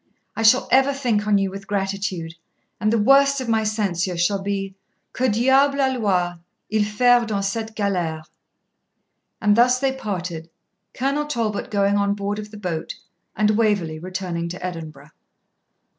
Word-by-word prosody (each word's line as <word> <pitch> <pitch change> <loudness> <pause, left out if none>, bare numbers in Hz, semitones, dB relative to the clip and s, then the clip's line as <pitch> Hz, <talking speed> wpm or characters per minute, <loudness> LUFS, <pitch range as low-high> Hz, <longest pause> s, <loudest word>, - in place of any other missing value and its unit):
I - - -3
shall 225 +4 +5
ever 270 +2 +4
think 230 -6 0
on 205 -1 +4
you 195 -1 0
with 195 0 -9
gratitude, 195 -4 -3 0.5
and 215 0 +1
the 230 - +2
worst 275 +5 +4
of 255 - -5
my 225 -1 +1
censure 190 -5 -1
shall 195 +3 +1
be, 195 -1 -3 0.4
Que 255 +1 +1
diable 265 +5 +3
alloit 200 -10 0 0.3
il 215 -1 +2
faire 245 +3 +3
dans 200 -2 -1
cette 220 +2 -4
galere?' 175 -6 -1 1.2
And 210 -1 +3
thus 250 +2 +4
they 270 0 +1
parted, 180 -9 -5 0.5
Colonel 280 +3 -1
Talbot 230 -7 -2
going 200 -1 +2
on 200 0 +1
board 205 +1 -3
of 210 0 -7
the 210 - -11
boat 180 -6 -4 0.4
and 215 0 +2
Waverley 205 -8 0
returning 180 -1 -4
to 180 +1 -6
Edinburgh. 155 -4 -8
205 Hz, 155 wpm, -22 LUFS, 185-230 Hz, 1.2 s, shall